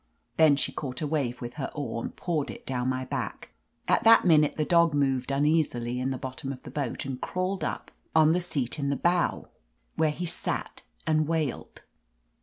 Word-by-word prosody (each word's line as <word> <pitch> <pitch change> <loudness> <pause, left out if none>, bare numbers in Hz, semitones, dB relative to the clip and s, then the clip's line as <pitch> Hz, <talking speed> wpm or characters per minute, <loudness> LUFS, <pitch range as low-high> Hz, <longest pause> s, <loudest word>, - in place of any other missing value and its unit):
Then 155 -3 +6
she 140 - -1
caught 130 -4 -5
a - - 0
wave 140 -5 -1
with 120 0 -5
her 135 - -2
oar, 140 -5 -3
and - - -6
poured 155 -5 -2
it - - -9
down 125 -1 -1
my 130 0 -2
back. - - -4 0.4
At - - +3
that 225 -2 +7
minute 155 -4 +5
the 155 - +1
dog 170 -2 +4
moved 135 -3 +1
uneasily 135 -4 +1
in 130 +1 -1
the 130 - -2
bottom 130 +1 -5
of 130 -2 -9
the - - -9
boat 140 -4 -3
and 130 -1 -5
crawled 185 -1 -2
up - - -4 0.2
on 160 0 +6
tL 180 - +2
.;.'iat 150 -6 -2
in 140 -1 0
the 140 - +1
bow, 175 +4 +1 0.5
where 160 - +3
he 175 +4 -3
sat 165 - -4 0.2
and 155 -1 +2
wailed. 155 -5 -3
145 Hz, 200 wpm, -27 LUFS, 130-160 Hz, 0.5 s, that